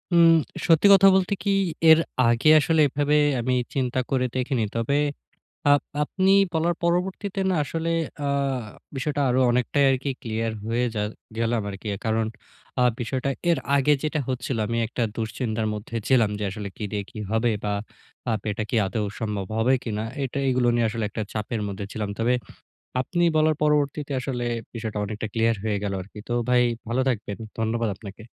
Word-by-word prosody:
উম 170 -1 +7 0.4
সত্যি 165 +3 +6
কথা 195 0 +7
বলতে 190 +1 +2
কি, 200 - 0 0.4
এর 160 0 +9 0.3
আগে 120 +6 +3
আসলে 160 +1 +2
এভাবে 145 +2 +1 0.2
আমি 125 +2 0 0.2
চিন্তা 130 -1 0
করে 130 -2 +1
দেখিনি। 130 -2 0
তবে, 115 +5 0 0.8
আব 145 0 +6 0.2
আপনি 190 +5 +1 0.2
বলার 165 +1 +1
পরবর্তীতে 185 +3 -1
না, - - +2
আসলে 165 +3 -3 0.3
আ - - 0 0.7
বিষয়টা 145 +2 -1
আরো 125 +1 +2
অনেকটাই 125 +4 +2
আরকি 135 +1 -1
clear 115 -2 -2 0.2
হয়ে 115 +2 +1
যা 105 - -1 0.3
গেলাম 115 0 0
আরকি। 95 +2 -9 0.2
কারণ, 110 0 +1 0.5
আ - - +4 0.2
বিষয়টা 130 +3 -1 0.2
এর 170 - +3 0.2
আগে 140 +1 +4
যেটা 155 0 -1
হচ্ছিলো, 125 -2 -2
আমি 115 +2 -1
একটা 120 +2 -3
দুশ্চিন্তার 110 0 -2
মধ্যে 105 +2 -8
ছিলাম, 120 -5 +4
যে 105 - -2
আসলে 100 +1 -5
কি - - -8
দিয়ে 105 -1 -1
কি 120 - -10
হবে? 115 +2 +2
বা 105 - 0 0.6
আব 110 -2 0
এটা 105 - -2
কি - - 0
আদৌ 105 +1 -2
সম্ভব 105 -4 -2
হবে 115 +4 +3
কিনা। 110 -2 -2 0.2
এটা 135 +1 -3
এইগুলো 125 -1 +2
নিয়ে 120 -1 +2
আসলে 115 0 -3
একটা 110 - -3
চাপের 110 +1 -3
মধ্যে 100 0 -5
ছিলাম। 105 -2 -3
তবে, 120 +2 +2 0.7
আপনি 175 +6 -1
বলার 155 0 +4
পরবর্তীতে 150 -1 +1
আসলে 125 -2 -3 0.3
বিষয়টা 110 -2 -4
অনেকটা 105 +2 -4
clear 115 0 +3
হয়ে 105 -2 0
গেলো 100 -1 -2
আরকি। 105 +3 -13
তো - - -2 0.2
ভাই, 125 0 +5 0.3
ভালো 120 +3 0
থাকবেন। 105 -5 -2 0.2
ধন্যবাদ 115 0 0
আপনাকে। 100 +1 -10
120 Hz, 170 wpm, -25 LUFS, 110-145 Hz, 0.8 s, এর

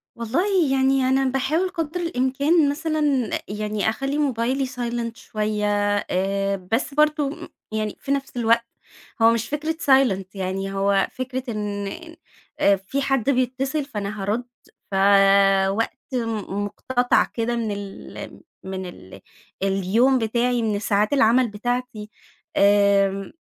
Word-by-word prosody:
والله 320 - +1
يعني 270 0 +3
أنا 270 +1 +2
باحاول 270 +8 0
قدر 330 -2 -3
الإمكان 285 0 +2
مثلًا 310 +1 -1 0.4
يعني 210 +1 -1
أخلّي 275 +5 -2
موبايلي 265 -1 0
silent 235 -2 -4
شويّة، 210 -1 -3 0.4
آآ 195 +1 0 0.2
بس 255 +5 0
برضه 305 +2 0 0.2
يعني 215 -1 -3
في 275 - -5
نفس 275 -2 -2
الوقت 230 0 +3 0.6
هو 225 0 +7
مش 230 -1 -1
فكرة 305 +2 -2
silent 265 -9 +4
يعني، 195 +1 -3
هو 195 0 +2
فكرة 255 0 -4
إن 205 -2 -3 0.7
أ 200 - +5
في 195 +9 -4
حد 270 -2 0
بيتّصل، 265 +3 0
فأنا 210 -5 -5
هارُد. 215 +5 -1 0.5
فَوقت 195 +1 +4 0.2
مُ 215 -4 -2
مقتطع 245 +4 +1
كده 235 +1 -2
من 230 -2 -2
ال 195 - -8 0.2
من 190 0 -5
ال 95 - -11 0.4
اليوم 195 +7 +2
بتاعي، 240 +2 0
من 215 -2 0
ساعات 210 +2 +1
العمل 250 -1 +4
بتاعتي. 225 0 -4 0.5
آمم 200 -1 +3
230 Hz, 125 wpm, -23 LUFS, 200-270 Hz, 0.7 s, هو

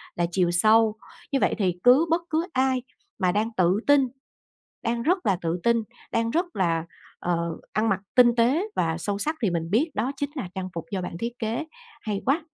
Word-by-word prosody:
là 175 - +1
chiều 175 -1 +2
sâu, 215 +4 +4 0.4
như 275 - +2
vậy - - +2
thì 185 -4 +1
cứ 265 +7 +6
bất 330 +2 +2
cứ 320 +1 0
ai 260 -1 +1 0.4
mà 185 -2 +2
đang 210 +4 0
tự 185 +2 +3
tin, 285 -2 +5 0.8
đang 235 0 -1
rất 360 +6 +1
là 195 -3 +2
tự 165 +1 -1
tin, 235 -1 +3 0.3
đang 230 0 +1
rất 340 +7 +1
là, 165 -3 +1 0.3
ờ, 170 -1 -1 0.2
ăn 220 +1 +1
mặc 195 -1 +1 0.2
tinh 240 -2 +6
tế 255 - +3
và 165 -1 0
sâu 200 +4 -2
sắc 305 +10 -1
thì 205 - +3
mình 165 -1 -2
biết 285 +10 +2
đó 240 +6 0
chính 285 0 -2
là 245 - -4
trang 185 -1 -4
phục 165 - -4
do 195 -2 -2
bạn 180 -1 -5
thiết 235 +1 -4
kế. 230 +7 -2 0.4
Hay 205 -2 -3
quá! 300 +5 +1
220 Hz, 210 wpm, -25 LUFS, 180-260 Hz, 0.8 s, cứ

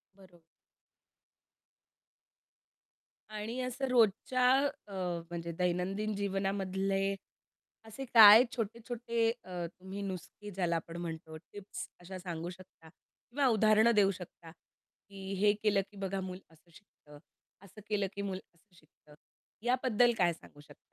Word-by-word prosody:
बरोबर. 185 -3 -19 2.9
आणि 215 +4 -5
असं 255 +1 -3
रोजच्या 250 +2 +3 0.4
अ, - - -13 0.4
म्हणजे 170 0 -5
दैनंदिन 185 +4 -1
जीवनामधले 195 0 -1 0.7
असे 245 +5 -7
काय 225 -1 +10
छोटे-छोटे 230 0 -2
अ, 180 -2 -5
तुम्ही 190 +2 -7
नुस्खे 200 +2 -7
ज्याला 175 -3 0
आपण 165 +1 -5
म्हणतो 160 -2 -6
टिप्स 200 +4 -9
अशा 185 +1 -8
सांगू 170 -2 -5
शकता 180 -3 -14
किंवा 260 - -4
उदाहरणं 220 0 +5
देऊ 200 -1 +5
शकता 175 -3 -11
की 195 +2 -13
हे 205 +1 +5
केलं 205 -2 +3
की 205 - -15
बघा 195 0 -3
मूल 185 0 -6
असं 160 +2 -24
शिकतं? 155 -5 -18 0.4
असं 200 +2 -14
केलं 205 -2 +1
की 200 - -3
मूल 190 -2 -3 0.2
असं 175 +3 -32
शिकतं? 150 -1 -22 0.5
याबद्दल 245 -1 +3
काय 175 -2 +3
सांगू 145 -2 -17
शकता? 145 0 -17
195 Hz, 125 wpm, -32 LUFS, 180-215 Hz, 2.9 s, काय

